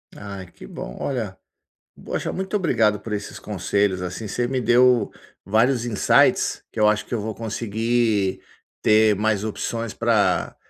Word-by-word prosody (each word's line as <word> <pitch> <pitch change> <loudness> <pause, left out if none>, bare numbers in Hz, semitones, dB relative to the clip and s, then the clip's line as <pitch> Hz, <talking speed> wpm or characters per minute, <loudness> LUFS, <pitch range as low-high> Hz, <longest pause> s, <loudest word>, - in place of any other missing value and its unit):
Ai 100 -2 -8
que - - -13
bom, - - -8
olha. 115 -8 -3 0.7
Poxa, - - -3
muito 190 +2 -2
obrigado 110 - +2
por 115 - -7
esses 105 -1 -5
conselhos, 100 -1 -1
assim, 90 +4 -5
você 120 +4 -1
me 130 0 -1
deu 120 -2 +4 0.3
vários 115 +4 +2
insights, 115 -4 +3
que 115 - -4
eu 105 - +6
acho 105 0 +1
que - - -16
eu 115 - -1
vou 110 +1 -4
conseguir 115 -2 0 0.4
ter 110 0 +4
mais 105 0 0
opções 115 +1 -3
para 115 -3 +1
110 Hz, 150 wpm, -23 LUFS, 100-120 Hz, 0.7 s, eu